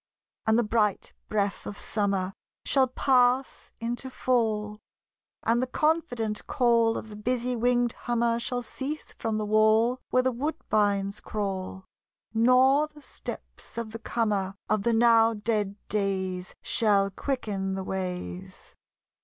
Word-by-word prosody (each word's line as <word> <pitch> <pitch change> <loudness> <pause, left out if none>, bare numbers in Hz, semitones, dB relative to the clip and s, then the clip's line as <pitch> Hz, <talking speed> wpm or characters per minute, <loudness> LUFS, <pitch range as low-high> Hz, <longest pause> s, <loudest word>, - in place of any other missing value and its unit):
And 220 +1 +4
the 240 - +3
bright 210 -2 0 0.2
breath 200 -2 -1
of 205 - -6
summer 195 -3 -1 0.3
Shall 265 -2 +3
pass 255 0 +2
into 240 +3 -3
fall; 220 -5 0 0.6
And 235 +2 +2
the 255 - 0
confident 250 -8 0
call 230 -3 +3
Of 220 - -7
the - - -8
busy 245 +3 -1
winged 245 0 +2
hummer 235 -1 0
Shall 245 +1 -3
cease 285 +5 -5
from 225 -1 -1
the 215 - -1
wall 220 +3 +3
Where 255 - +3
the 260 - +2
woodbines 210 -8 0
crawl; 190 -2 -4 0.5
Nor 255 +6 +5
the 300 -1 -17
steps - - -9
of 230 -2 -3
the 225 - -7
comer 205 -5 -1
Of 215 -1 +1
the 235 +3 +1
now 230 0 +5
dead 210 -2 -1
days 190 -3 -2
Shall 200 -3 +2
quicken 195 -5 -2
the 190 - -3
ways. 185 0 -5
225 Hz, 135 wpm, -27 LUFS, 205-245 Hz, 0.6 s, Nor